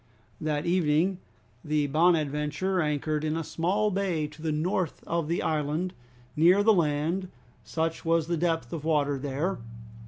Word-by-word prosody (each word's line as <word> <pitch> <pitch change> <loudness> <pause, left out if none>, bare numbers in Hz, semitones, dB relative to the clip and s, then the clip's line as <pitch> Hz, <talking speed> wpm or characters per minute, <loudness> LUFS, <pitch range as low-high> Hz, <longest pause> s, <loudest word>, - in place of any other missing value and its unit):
That 155 0 -1
evening 175 +1 +2 0.4
the 150 -1 +1
"Bonadventure" 155 +3 +1
anchored 150 0 -1
in 155 +1 0
a 165 - -2
small 195 +7 0
bay 185 -5 0
to 155 +1 -14
the 160 -1 -1
north 165 +2 -1
of 170 -2 -1
the 170 +2 -1
island, 155 +4 -1 0.4
near 180 +6 +5
the 220 +1 +6
land, 165 +2 0 0.4
such 165 0 -2
was 165 -1 +2
the 170 +1 -1
depth 165 0 -1
of 160 -3 -4
water 145 -3 +1
there. 145 +7 -2
160 Hz, 150 wpm, -28 LUFS, 150-175 Hz, 0.4 s, the